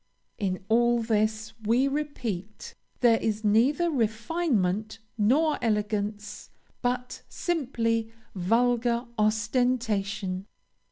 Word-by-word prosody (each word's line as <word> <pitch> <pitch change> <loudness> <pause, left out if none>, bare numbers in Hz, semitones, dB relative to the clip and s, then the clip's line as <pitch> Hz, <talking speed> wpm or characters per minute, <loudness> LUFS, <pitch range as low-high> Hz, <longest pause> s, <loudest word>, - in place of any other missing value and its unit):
In 185 -3 -2
all 235 +1 +3
this, 220 0 0
we 240 +5 +3
repeat, 240 -9 -4 0.3
there 230 -2 +5
is 220 0 -2
neither 260 +11 +3
refinement 220 - 0 0.2
nor 275 +9 +2
elegance, 210 -2 -2 0.3
but 250 0 -2
simply 230 - -1 0.2
vulgar 235 +5 +1
ostentation. 215 -4 0
225 Hz, 80 wpm, -27 LUFS, 210-245 Hz, 0.3 s, there